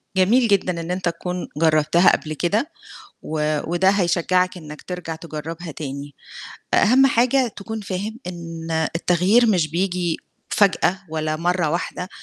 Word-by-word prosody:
جميل 225 +7 +4
جدًا 185 -4 +1
إن 165 +1 -5
أنت 180 0 -3
تكون 180 +1 -5
جرّبتها 160 +2 +4
قبل 155 - -7
كده 210 - -1 0.5
و 150 -1 -1
وده 180 +2 +3
هيشجّعك 180 -1 +1
إنّك 150 -3 -10
ترجع 180 -3 -5
تجرّبها 165 +1 -7
تاني. 140 -1 -7 0.6
أ - - +5
أهم 260 +5 +6
حاجة 255 +1 +3
تكون 220 +2 -6
فاهم 200 +2 -4
إن 165 -2 -7 0.3
التغيير 180 +8 +3
مش 180 -8 +2
بييجي 175 -1 -1 0.3
فجأة 195 -2 +2
ولا 155 0 -2
مرّة 175 -1 0
واحدة 180 +2 -3
175 Hz, 135 wpm, -22 LUFS, 160-195 Hz, 0.6 s, أهم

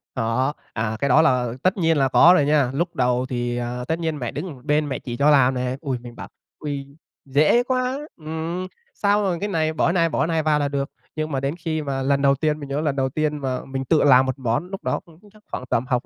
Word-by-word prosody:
Có. 125 +3 0 0.2
À, 110 0 -2
cái 140 - 0
đó 125 - +6
là 125 -6 +2
tất 185 +2 +2
nhiên 165 -3 +2
là 135 -1 +3
có 165 +6 +7
rồi 150 -6 +3
nha. 145 -4 +2
Lúc 170 +5 -2
đầu 125 0 +1
thì, 120 -1 -2
ờ, 120 +1 -4
tất 160 +1 -1
nhiên 160 -2 -2
mẹ 120 -3 -3
đứng 165 +5 -5
một 125 -2 -16
bên 150 0 +1
mẹ 130 - -3
chỉ 120 -1 -6
cho 145 +3 +4
làm 135 -3 +5
nè. 125 0 -2
Ôi, 135 -5 -2
mình 120 -1 -10
bảo - - -8 0.3
"Ôi, 145 -2 -4 0.4
dễ 150 - +3
quá!" 255 +1 -1 0.2
Ừm. 165 +3 -4 0.3
Sau 205 0 +2
rồi 185 -3 0
cái 205 - -2
này 160 -4 0
bỏ 160 - +2
này, 170 -2 +2
bỏ - - 0
này 165 -1 0
vào 150 -1 +2
là 145 - +1
được. 140 0 -2 0.3
Nhưng 155 0 -3
mà 135 - 0
đến 135 +3 -2
khi 160 -2 -2
mà 135 -2 -3
lần 140 +1 +1
đầu 140 0 +4
tiên 150 +1 -1
mình 140 -2 -8
nhớ 140 +2 -1
lần 150 -3 0
đầu 135 -1 0
tiên 150 +2 -1
mà 130 -3 -3
mình 135 0 -4
tự 155 +4 +3
làm 130 -2 +6
một 130 +1 -3
món 120 +7 -1
lúc 195 0 -7
đó - - -1
cũng 165 -1 -19
chắc 215 -1 -20
khoảng - - -4
tầm 115 - +1
học 125 -2 0
145 Hz, 260 wpm, -22 LUFS, 130-160 Hz, 0.4 s, có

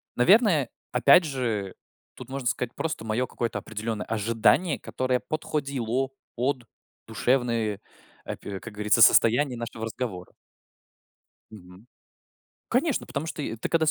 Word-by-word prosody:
наверное, 170 - +4 0.2
опять 140 +7 +6
же, 115 - -2 0.4
тут 130 -1 -11
можно 135 -2 -4
сказать 120 0 -1
просто 155 -8 -3
мое 110 +3 0
какое-то 115 -3 -3
определенное 110 +1 -4
ожидание, 115 - +2
которое 130 -1 -1
подходило 135 -5 -2 0.3
под 125 0 -1 0.4
душевные, 115 -1 0 0.5
апи 100 -1 -6
как 110 +4 -10
говорится, 105 +2 +2
состояние 120 +4 +5
нашего 115 -1 -5
разговора. 110 -5 -5 1.2
Мгм. 90 -1 -14 0.8
Конечно, 270 +3 +1
потому 140 +3 -4
что, 160 -2 -5
э, 115 - -4
ты 110 - -4
когда 160 -1 +2
с - - +5
120 Hz, 125 wpm, -26 LUFS, 110-140 Hz, 1.2 s, опять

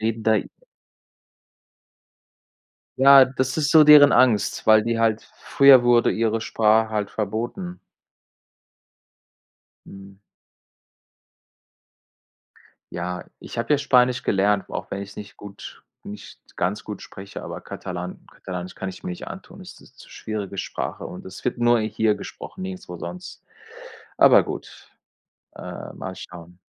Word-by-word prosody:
leben 110 0 -2
da 110 -1 +4
i 100 - -3 2.5
Ja, 135 0 +8
das 130 +1 -3
ist 150 -2 0
so 160 -1 +8
deren 150 -1 +8
Angst, 120 -5 +2
weil 110 0 +6
die 115 +1 -2
halt 110 -1 +1
früher 140 -3 +5
wurde 120 -1 +4
ihre 115 0 0
Sprache 110 0 +2
halt 105 -2 -2
verboten. 120 - -4 2.1
Hm. 95 0 -13 2.8
Ja, 90 0 -5
ich - - -10
habe 115 +6 0
ja - - +3
Spanisch 125 -3 +2
gelernt, 100 0 +1
auch - - -6
wenn 100 - -4
ich 100 - -8
es - - -16
nicht 105 -1 -10
gut 100 -1 -11 0.2
nicht 105 +1 -11 0.2
ganz 95 +5 -2
gut 105 -3 -8
spreche, 95 +1 -10
aber - - -8
Katalan 90 0 -7
Katalanisch 90 0 -8
kann 95 - -5
ich 95 - -12
mir - - -5
nicht 90 - -7
antun - - -10
ist - - -13
'ne - - -17
zu - - -17
schwierige 105 -3 -6
Sprache - - -5
und 90 - -10
es 95 0 -11
wird 125 - -2
nur 120 0 +3
hier 110 0 0
gesprochen, 105 - -9
nirgendswo 185 - -7
sonst. 90 +2 -9 0.8
Aber - - +7
gut, - - -9 0.7
äh, - - -9
mal - - -7
schauen. 85 0 -12
110 Hz, 135 wpm, -23 LUFS, 100-125 Hz, 2.8 s, Ja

